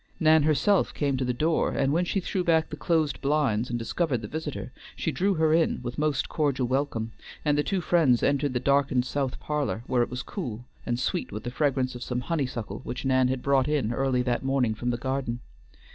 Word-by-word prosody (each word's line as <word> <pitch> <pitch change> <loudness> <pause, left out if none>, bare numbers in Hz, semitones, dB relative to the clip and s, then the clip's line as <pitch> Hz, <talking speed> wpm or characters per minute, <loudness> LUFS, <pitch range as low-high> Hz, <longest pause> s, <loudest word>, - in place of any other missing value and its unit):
Nan 160 -1 +5
herself 155 +7 +2
came 140 -2 0
to 130 - -1
the 125 - 0
door, 155 +6 +1
and 135 0 +1
when 175 +3 +2
she 195 - 0
threw 185 0 -2
back 160 -2 +2
the - - -3
closed 155 -2 0
blinds 135 -6 +1
and 120 - -1
discovered 125 +1 -1
the - - -4
visitor, 150 -2 -5 0.2
she 160 - -1
drew 190 +8 +1
her 160 -1 +3
in 165 0 +2
with 120 +3 -5
most 150 -2 +1
cordial 140 -4 0
welcome, 120 -3 -1 0.3
and 150 -1 +3
the 145 - +3
two 190 +4 -1
friends 155 -8 +3
entered 140 -1 +1
the 125 - +1
darkened 135 -1 +2
south 135 -1 -2
parlor, 150 -6 -2
where 125 -2 +1
it 120 - 0
was 125 +2 -4
cool, 125 - -5 0.2
and 120 0 0
sweet 175 +7 -2
with 105 +2 -6
the 120 - -4
fragrance 130 -2 0
of 125 - -8
some 125 0 -2
honeysuckle 125 - -3
which 125 - -5
Nan 130 -1 +3
had 130 0 -2
brought 135 -2 +3
in 140 -7 0
early 130 -1 +1
that 120 -1 0
morning 135 -4 +1
from 120 +3 -3
the 120 - 0
garden. 130 -1 -2
135 Hz, 220 wpm, -27 LUFS, 125-155 Hz, 0.3 s, Nan